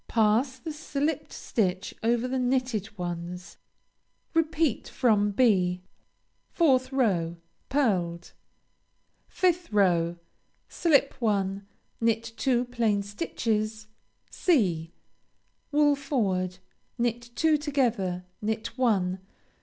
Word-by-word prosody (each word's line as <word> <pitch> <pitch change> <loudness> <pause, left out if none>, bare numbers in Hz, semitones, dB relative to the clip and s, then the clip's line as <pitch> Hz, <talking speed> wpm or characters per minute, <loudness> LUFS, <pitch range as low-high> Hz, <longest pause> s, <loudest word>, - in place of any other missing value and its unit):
Pass 230 +4 +2
the 310 +5 -6
slipped 300 0 -2
stitch 190 -4 -1
over 235 +2 +1
the 260 +1 -1
knitted 250 -5 -1
ones. 175 0 -5 0.8
Repeat 320 -4 +1
from 210 -5 +2
(b.) 185 -5 +2 0.7
4th 265 -6 +3
row 180 -11 +1 0.3
Pearled. 185 -11 0 1.0
5th 355 -1 +1
row 175 -5 +3 0.5
Slip 285 -5 +2
one. 200 -3 0 0.3
Knit 225 0 +2
two 250 -1 +1
plain 230 -5 0
stitches, 215 -1 -2 0.4
(c.) 180 - +1 0.8
Wool 295 0 +4
forward. 195 -11 -1 0.4
Knit 240 -1 0
two 320 +2 +3
together. 240 - 0 0.2
Knit 220 +1 -3
one. 190 -7 +2
225 Hz, 90 wpm, -27 LUFS, 190-265 Hz, 1.0 s, Wool